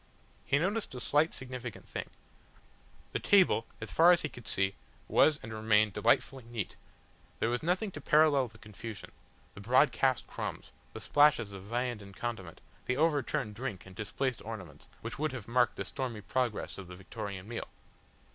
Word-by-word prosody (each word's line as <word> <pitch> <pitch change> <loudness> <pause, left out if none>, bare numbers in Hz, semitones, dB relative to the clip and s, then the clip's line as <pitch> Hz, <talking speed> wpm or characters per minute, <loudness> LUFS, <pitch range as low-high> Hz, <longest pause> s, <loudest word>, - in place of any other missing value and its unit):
He 140 - +4
noted 195 - -1
a - - -4
slight 150 +6 +2
significant 125 -4 -7
thing; - - -5 1.0
the - - -1
table, 185 - +4
as 110 - -5
far 170 +2 +7
as 175 - +4
he 150 - -1
could 120 -7 -11
see, 95 0 +1 0.3
was 155 -1 +4
and 110 - -6
remained 110 -1 +3
delightfully 130 +5 +2
neat, 115 -4 -4 0.6
there 115 - +1
was 120 - 0
nothing 185 +5 0
to 155 - -8
parallel 150 -3 +4
the 110 -1 -16
confusion, 105 -1 -9 0.4
the 100 - -10
broadcast 130 +2 +3
crumbs, - - -6 0.2
the - - -6
splashes 145 -8 +4
of 95 -1 -9
viand 120 0 -2
and 100 0 -12
condiment, 100 -8 -5 0.3
the 125 - +1
overturned 145 -8 +1
drink 110 -4 -5
and 95 0 -13
displaced 125 +5 -2
ornaments, 100 -8 -8
which 115 +3 -6
would 155 -2 0
have 120 -5 -6
marked 120 +1 +3
the - - -4
stormy 125 -6 -4
progress 120 -1 -1
of 95 - -8
the 90 - -9
Victorian 95 +1 -6
meal. 115 0 -5
120 Hz, 170 wpm, -32 LUFS, 105-140 Hz, 1.0 s, far